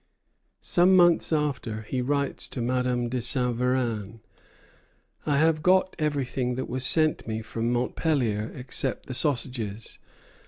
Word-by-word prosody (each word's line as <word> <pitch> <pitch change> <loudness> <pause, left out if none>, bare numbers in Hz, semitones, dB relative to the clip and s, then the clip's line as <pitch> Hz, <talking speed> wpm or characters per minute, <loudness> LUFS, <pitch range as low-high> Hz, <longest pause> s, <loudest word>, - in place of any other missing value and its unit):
Some 180 +2 +4
months 175 -2 +4
after, 135 -8 -1
he 125 +4 -3
writes 140 +2 0
to - - -6
Madame 125 0 0
de 125 +1 -2
Saint 125 0 +2
Véran: 115 -4 -1 1.1
"I 145 -2 +2
have 155 +1 +2
got 185 +2 +3
everything 135 -4 -1
that 130 - -4
was 130 +1 -3
sent 155 +1 +3
me 110 0 -3
from 115 +1 -2
Montpellier 120 -3 -1
except 130 +1 -2
the 130 - -6
sausages. 120 -6 -2
125 Hz, 130 wpm, -26 LUFS, 120-145 Hz, 1.1 s, Some